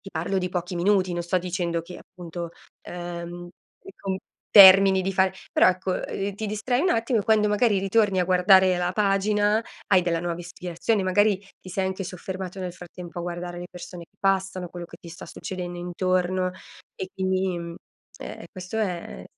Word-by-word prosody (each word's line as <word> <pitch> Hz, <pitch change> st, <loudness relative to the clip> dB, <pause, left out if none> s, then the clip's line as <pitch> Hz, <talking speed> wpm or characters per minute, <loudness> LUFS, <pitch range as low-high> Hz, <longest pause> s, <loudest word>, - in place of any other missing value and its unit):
ti 195 Hz, -, -11 dB
parlo 175 Hz, +4 st, -1 dB
di 180 Hz, 0 st, -2 dB
pochi 180 Hz, 0 st, -3 dB
minuti, 185 Hz, 0 st, +2 dB
non 175 Hz, -, -2 dB
sto 175 Hz, +2 st, 0 dB
dicendo 175 Hz, -1 st, -2 dB
che 175 Hz, +2 st, -10 dB
appunto, 175 Hz, -1 st, -8 dB, 0.3 s
ehm, 175 Hz, 0 st, -7 dB, 0.4 s
ecco 195 Hz, -, -5 dB, 0.4 s
termini 190 Hz, -1 st, +9 dB
di 195 Hz, +1 st, -1 dB
fare 190 Hz, 0 st, +2 dB, 0.2 s
però -, -, +5 dB
ecco, 185 Hz, +1 st, -1 dB
uhm, 195 Hz, +2 st, -3 dB
ti 220 Hz, -, -3 dB
distrai 220 Hz, +5 st, -1 dB
un 365 Hz, -, +2 dB
attimo 230 Hz, +1 st, +1 dB
e 205 Hz, -, -2 dB
quando 215 Hz, -1 st, +3 dB
magari 210 Hz, -1 st, +2 dB
ritorni 195 Hz, -1 st, +2 dB
a -, -, +2 dB
guardare 185 Hz, 0 st, +5 dB
la 180 Hz, 0 st, -1 dB
pagina, 205 Hz, +1 st, +2 dB, 0.3 s
hai 190 Hz, -2 st, +5 dB
della 170 Hz, -2 st, -1 dB
nuova 175 Hz, -1 st, -3 dB
ispirazione, 180 Hz, +4 st, -2 dB
magari 205 Hz, +2 st, +3 dB, 0.2 s
ti 185 Hz, -, -12 dB
sei 190 Hz, +1 st, -1 dB
anche 190 Hz, 0 st, -3 dB
soffermato 185 Hz, +1 st, -6 dB
nel 180 Hz, -1 st, -4 dB
frattempo 180 Hz, 0 st, -10 dB
a -, -, -3 dB
guardare 175 Hz, 0 st, -5 dB
le 175 Hz, -, -6 dB
persone 180 Hz, -1 st, -9 dB
che 200 Hz, -, -41 dB
passano, 190 Hz, -2 st, 0 dB
quello 175 Hz, -1 st, -8 dB
che -, -, -13 dB
ti 170 Hz, -, -11 dB
sta 175 Hz, +3 st, -10 dB
succedendo 180 Hz, -2 st, -6 dB
intorno, 185 Hz, +1 st, 0 dB, 0.4 s
e 190 Hz, -, -5 dB
quindi, 190 Hz, -1 st, -1 dB
mhmm, 170 Hz, 0 st, -7 dB, 0.5 s
e -, -, -6 dB, 0.2 s
e -, -, -9 dB
questo 185 Hz, +3 st, -6 dB
è 180 Hz, -6 st, -3 dB
185 Hz, 185 wpm, -25 LUFS, 175-195 Hz, 0.5 s, termini